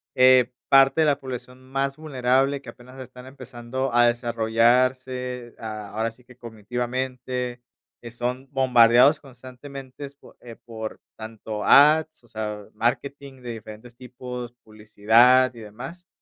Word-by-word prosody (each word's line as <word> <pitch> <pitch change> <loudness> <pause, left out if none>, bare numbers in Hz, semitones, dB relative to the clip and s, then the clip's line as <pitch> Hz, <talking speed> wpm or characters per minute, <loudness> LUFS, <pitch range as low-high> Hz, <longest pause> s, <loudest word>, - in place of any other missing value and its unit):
eh, 130 -1 +5 0.2
parte 135 +3 +5
de - - +4
la 145 -2 +1
población 125 0 -8
más 135 +1 -2
vulnerable 135 -2 0
que 140 - -12
apenas 125 +1 -14
están 125 0 -11
empezando 130 -1 -6
a 120 0 +5
desarrollarse, 120 +2 0
ah, 110 -2 -7
ahora 110 +2 -1
sí 115 +3 -19
que 125 0 -19
cognitivamente, 125 +2 -5 0.4
eh, 120 - -9
son 125 +3 -4
bombardeados 125 +1 +5
constantemente 135 +1 -11
po - - -19
eh, 120 -2 -11
por 110 -2 -8 0.2
tanto 110 -1 -7
ads, 155 +1 +5
o - - -23
sea, 105 -2 -6
marketing 135 +4 -3
de 120 - -6
diferentes 110 +2 -11
tipos, 125 -1 -8
publicidad 110 +4 +3
y 120 - -13
demás 130 +12 -10
125 Hz, 135 wpm, -23 LUFS, 115-130 Hz, 0.4 s, eh